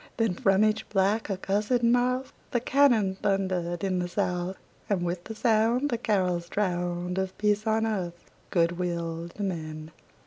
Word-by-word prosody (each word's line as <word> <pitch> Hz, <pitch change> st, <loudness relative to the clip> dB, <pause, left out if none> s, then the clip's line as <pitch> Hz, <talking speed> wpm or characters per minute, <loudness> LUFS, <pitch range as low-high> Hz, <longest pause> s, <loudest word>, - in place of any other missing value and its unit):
Then 225 Hz, -5 st, +2 dB
from 195 Hz, +3 st, +3 dB
each 215 Hz, 0 st, 0 dB
black, 205 Hz, +2 st, +1 dB
accursed 205 Hz, +5 st, 0 dB
mouth 250 Hz, +2 st, +2 dB, 0.2 s
The 240 Hz, -, +1 dB
cannon 235 Hz, -7 st, +3 dB
thundered 185 Hz, -3 st, 0 dB
in 185 Hz, -2 st, 0 dB
the 180 Hz, -, -1 dB
South, 180 Hz, +1 st, -2 dB, 0.3 s
And 195 Hz, -4 st, +1 dB
with 175 Hz, 0 st, -3 dB
the 220 Hz, -, -6 dB
sound 230 Hz, +5 st, +2 dB
The 235 Hz, -, -1 dB
carols 180 Hz, -6 st, 0 dB
drowned 180 Hz, -2 st, -1 dB
Of 190 Hz, 0 st, -3 dB
peace 210 Hz, +1 st, +1 dB
on 220 Hz, 0 st, +2 dB
earth, 180 Hz, -6 st, -2 dB, 0.3 s
good 170 Hz, 0 st, +1 dB
will 170 Hz, -1 st, -3 dB
to 205 Hz, -, -6 dB
men! 155 Hz, -4 st, -4 dB
195 Hz, 160 wpm, -27 LUFS, 175-220 Hz, 0.3 s, from